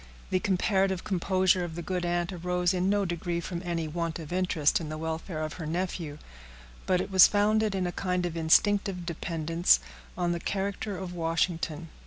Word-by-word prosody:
The 185 Hz, -, +3 dB
comparative 190 Hz, -1 st, +1 dB
composure 185 Hz, -1 st, +2 dB
of 165 Hz, -2 st, -5 dB
the 170 Hz, -, -5 dB
good 180 Hz, +1 st, -2 dB
aunt 175 Hz, +1 st, -1 dB
arose 180 Hz, +1 st, 0 dB
in 185 Hz, +1 st, +1 dB
no 205 Hz, 0 st, +2 dB
degree 175 Hz, 0 st, -2 dB
from 170 Hz, 0 st, -5 dB
any 170 Hz, -2 st, -2 dB
want 165 Hz, +1 st, -3 dB
of 165 Hz, 0 st, -7 dB
interest 175 Hz, -5 st, +2 dB
in 155 Hz, -, -5 dB
the 155 Hz, -, -4 dB
welfare 160 Hz, 0 st, -4 dB
of 155 Hz, -, -4 dB
her 155 Hz, -, -4 dB
nephew, 170 Hz, -3 st, -3 dB, 0.7 s
but 185 Hz, -1 st, +3 dB
it 185 Hz, -, -3 dB
was 190 Hz, -1 st, +9 dB
founded 210 Hz, 0 st, +2 dB
in 185 Hz, -1 st, 0 dB
a 175 Hz, -, -1 dB
kind 180 Hz, -1 st, -1 dB
of 170 Hz, -2 st, -3 dB
instinctive 180 Hz, +3 st, +2 dB
dependence 165 Hz, -, +2 dB, 0.4 s
on 175 Hz, -1 st, 0 dB
the 170 Hz, -, -1 dB
character 200 Hz, +2 st, -3 dB
of 180 Hz, -1 st, -6 dB
Washington. 165 Hz, -1 st, -1 dB
175 Hz, 185 wpm, -28 LUFS, 165-185 Hz, 0.7 s, was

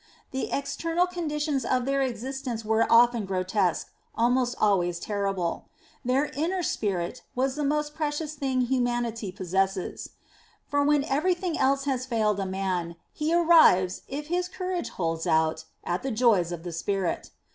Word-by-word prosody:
The 265 Hz, -, -3 dB
external 330 Hz, +5 st, 0 dB
conditions 300 Hz, -5 st, -2 dB
of 250 Hz, -1 st, 0 dB
their 275 Hz, 0 st, +1 dB
existence 255 Hz, -1 st, -3 dB
were 220 Hz, +1 st, +2 dB
often 235 Hz, -1 st, +5 dB
grotesque, 185 Hz, -1 st, 0 dB, 0.2 s
almost 245 Hz, +1 st, +2 dB
always 180 Hz, -5 st, +2 dB
terrible. 195 Hz, -4 st, -2 dB, 0.4 s
Their 260 Hz, +3 st, +2 dB
inner 345 Hz, +6 st, -1 dB
spirit 195 Hz, -, -2 dB
was 260 Hz, +1 st, +1 dB
the 300 Hz, -, -2 dB
most 295 Hz, +1 st, 0 dB
precious 305 Hz, 0 st, -2 dB
thing 270 Hz, -3 st, -1 dB
humanity 240 Hz, -4 st, -1 dB
possesses. 190 Hz, 0 st, -2 dB, 0.6 s
For 285 Hz, 0 st, +1 dB
when 290 Hz, -1 st, +3 dB
everything 345 Hz, +4 st, 0 dB
else 275 Hz, +1 st, +2 dB
has 260 Hz, -2 st, -1 dB
failed 215 Hz, -4 st, +1 dB
a 195 Hz, -, -2 dB
man, 185 Hz, -3 st, -2 dB, 0.2 s
he 305 Hz, +1 st, -1 dB
arrives, 320 Hz, -, +5 dB
if 290 Hz, +2 st, -5 dB
his 355 Hz, +3 st, -1 dB
courage 365 Hz, -1 st, -3 dB
holds 165 Hz, -1 st, -2 dB
out, 160 Hz, -1 st, +1 dB, 0.2 s
at 175 Hz, +1 st, -2 dB
the 270 Hz, -, -3 dB
joys 215 Hz, -8 st, +3 dB
of 170 Hz, -2 st, -5 dB
the 175 Hz, -, -5 dB
spirit. 190 Hz, +2 st, -2 dB
245 Hz, 145 wpm, -27 LUFS, 195-295 Hz, 0.6 s, often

